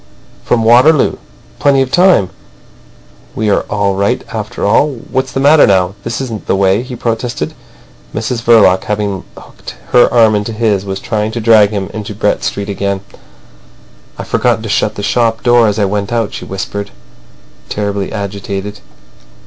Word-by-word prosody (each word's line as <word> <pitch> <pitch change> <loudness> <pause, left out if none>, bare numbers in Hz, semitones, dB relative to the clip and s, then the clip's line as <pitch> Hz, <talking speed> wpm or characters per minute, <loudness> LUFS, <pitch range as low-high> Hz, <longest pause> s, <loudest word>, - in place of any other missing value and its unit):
"From 115 -2 +1
Waterloo. 125 +7 +4 0.4
Plenty 140 -2 +3
of 130 - -7
time. 175 - +3 1.0
We 110 -1 0
are - - +1
all 100 -2 0
right 100 +1 0
after - - -4
all.... 140 +8 +2 0.2
What's 130 -1 -1
the - - -2
matter 145 +2 +5
now? 95 -1 +2
This 115 0 -4
isn't 115 -5 -6
the - - +2
way," 95 +2 +2
he 125 0 -7
protested. 115 0 -3 0.6
Mrs 115 +2 -3
Verloc, 110 -6 +4
having 100 -3 -2
hooked - - -11 0.2
her 125 - +5
arm 115 -3 +4
into 105 +2 -2
his, 105 -3 0
was 95 -1 -4
trying 110 0 -2
to 120 - -3
drag 110 -2 +5
him 100 -2 -4
into 105 -1 -6
Brett 105 0 0
Street 100 0 -3
again. 100 -1 -2 1.2
"I've - - -7
forgotten 110 - +1
to 110 - -5
shut 105 +1 0
the 100 - -6
shop 115 +2 0
door 120 -2 +4
as 105 0 -1
I 105 - +2
went 100 +1 -2
out," 115 -3 -1
she - - -7
whispered, 100 +1 -5 0.8
terribly 100 -1 -3
agitated. 100 0 -5
105 Hz, 165 wpm, -13 LUFS, 100-120 Hz, 1.2 s, matter